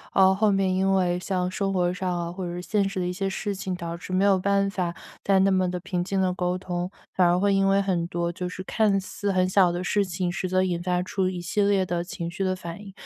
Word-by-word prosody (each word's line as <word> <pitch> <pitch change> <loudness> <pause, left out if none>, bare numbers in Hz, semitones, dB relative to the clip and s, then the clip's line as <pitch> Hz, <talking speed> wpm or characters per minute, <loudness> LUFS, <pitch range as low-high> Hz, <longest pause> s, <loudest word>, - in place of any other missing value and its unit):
然 190 - +7
后 190 - +5
后 210 +1 +2
面 195 -1 +2
因 190 +1 +2
为 180 -2 +2
像 180 -1 -1
生 195 0 -1
活 180 -1 +1
上 180 0 -2
啊 170 0 -4
或 185 +1 -6
者 175 0 -4
是 180 - -4
现 200 -1 +1
实 195 -1 -4
的 180 - -1
一 180 - -2
些 195 +1 -2
事 200 +1 -3
情， 190 -1 -4
导 170 -1 -5
致 180 - -9
没 185 +2 +2
有 195 -2 +4
办 200 +1 +2
法 180 -3 -2 0.3
再 195 -1 +3
那 195 +1 +4
么 185 -1 +2
地 180 0 -3
平 180 -2 -2
静 195 +1 -1
地 185 -1 +2
沟 180 -1 -1
通。 180 -1 -3 0.2
反 180 -2 +4
而 175 +1 +3
会 200 0 +3
因 195 0 +3
为 195 0 +4
很 180 -4 0
多 170 0 -2
就 180 0 -4
是 185 +1 -7
看 205 -1 +2
似 200 +1 -3
很 185 -1 +2
小 185 -2 +4
的 175 +1 -3
事 205 +3 +2
情， 180 -1 -2
实 180 +1 -3
则 185 0 +2
引 175 -2 -1
发 180 0 0
出 185 0 -1
一 180 -1 -4
系 175 +4 -1
列 200 -2 +3
的 175 -1 -2
情 170 -2 -5
绪 195 +2 -3
的 185 0 0
反 170 +1 -8
应， 200 -1 -10
185 Hz, 305 characters per minute, -25 LUFS, 180-195 Hz, 0.3 s, 然